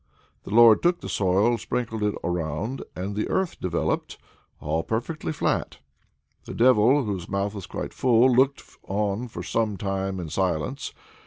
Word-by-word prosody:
The - - -8
Lord 115 0 +7
took 175 0 +2
the - - -6
soil, 100 +5 +2
sprinkled 115 -3 -3
it 105 -1 0
around, 85 - -2
and 95 +3 -4
the 105 - -2
Earth 190 -3 -1
appeared, 90 - -1 0.4
all 80 +2 -1
perfectly 120 - -3
flat. 150 - -1 0.7
The - - -7
Devil, 130 +3 +5
whose 95 -6 -4
mouth 100 +1 -1
was 100 -3 -7
quite - - -5
full, 125 0 +4
looked 135 +3 +3 0.2
on 105 +4 -1
for 115 - -7
some 110 -3 -1
time 95 0 -2
in 85 -3 -5
silence. 85 -3 -2
105 Hz, 155 wpm, -25 LUFS, 95-120 Hz, 0.7 s, Lord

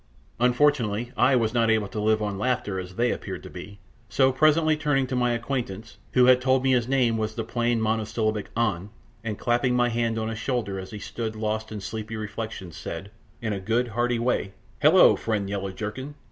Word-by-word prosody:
Unfortunately 125 -3 +2
I 135 - +4
was 115 -2 +1
not 115 -2 +2
able 110 -2 +2
to 105 - -4
live 110 0 +2
on 100 -2 -3
laughter, 120 -5 -1
as 90 0 -8
they 120 +3 +2
appeared - - -5
to - - -10
be, 100 +1 -9 0.3
so 130 -1 +3
presently 155 +3 +4
turning 145 -3 +1
to 130 - -3
my 120 -1 +2
acquaintance, 115 -3 -4
who 125 -1 +6
had 130 0 +6
told 130 0 +2
me 135 - +3
his 120 -2 +2
name 125 -4 +2
was 110 0 -2
the 115 - -2
plain 120 +1 0
monosyllabic 110 -1 -1
An, 100 -5 0 0.3
and 110 -2 -3
clapping 125 +1 +1
my 120 0 +3
hand 115 -1 0
on 110 0 -2
his 110 -1 -5
shoulder 110 -8 -2
as 95 0 -8
he 105 - -7
stood 110 +1 -5
lost 110 0 -3
in 105 -2 -5
sleepy 110 +2 -5
reflection, 110 -3 -5
said, 90 +5 -7 0.3
in 110 -2 -1
a 100 - -3
good, 115 +5 0
hearty 120 +2 0
way, 115 -5 -1 0.3
"Hullo, - - +7
friend 105 -3 -2
Yellow 100 -1 -3
jerkin! 110 +9 -6
115 Hz, 200 wpm, -25 LUFS, 105-125 Hz, 0.3 s, Hullo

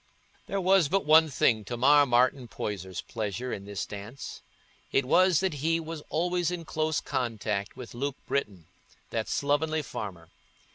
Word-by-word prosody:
There 195 - -1
was 190 -4 +4
but 195 +1 +1
one 160 +1 +6
thing 115 -5 +2
to 120 +3 -4
mar 145 +3 +6
Martin 125 +1 +2
Poyser's 95 -5 -5
pleasure 115 +3 -4
in 100 - -6
this 100 -1 -4
dance: 105 +6 -8 0.5
it 135 - +2
was 180 +4 +4
that 190 -3 0
he 160 +4 0
was 165 -1 -6
always 175 +1 0
in 175 -2 -4
close 155 0 0
contact 110 -6 -2
with 125 - -9
Luke 140 +3 -3
Britton, 100 - -2 0.5
that 110 -1 -2
slovenly 155 +2 +1
farmer. 90 - -7
140 Hz, 155 wpm, -28 LUFS, 110-160 Hz, 0.5 s, one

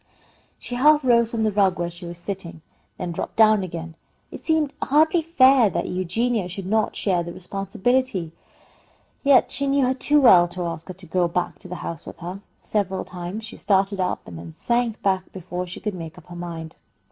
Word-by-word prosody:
She - - -7
half 295 +4 +5
rose 235 -2 +4
from 230 -1 -1
the 215 - +2
rug 195 -2 +2
where 175 0 -2
she 170 +1 -10
was 170 0 -7
sitting, 170 -3 -7 0.3
then 180 -2 -4
dropped 170 - -5
down 215 -2 +5
again. 170 -2 -6 0.4
It - - -9
seemed 315 -3 +1
hardly 315 +4 +3
fair 270 - +5
that - - -2
Eugenia 205 +3 -1
should 185 +1 -7
not 215 +2 +1
share 185 -4 +1
the 170 0 -6
responsibility, 195 +1 -1 0.9
yet 275 -2 +5
she 280 - -2
knew 275 -1 +3
her 255 - +2
too 295 +3 +2
well 180 -10 +7
to 180 +1 -5
ask 165 -1 -5
her 185 - -7
to 185 0 -13
go 175 +1 +1
back 175 +1 -2
to 185 - -9
the 180 - -6
house 165 -1 -6
with - - -9
her. 180 +3 -7 0.2
Several 195 -3 -1
times 180 +5 -6
she 220 - -10
started 195 0 +1
up 185 - -2
and 85 -2 -8
then 85 -1 -9
sank 235 -2 -1
back 190 -1 0
before 180 0 -5
she 180 - -8
could 210 -2 -3
make 165 -3 -8
up - - -14
her 175 - -9
mind. 165 -2 -7
190 Hz, 205 wpm, -23 LUFS, 175-235 Hz, 0.9 s, well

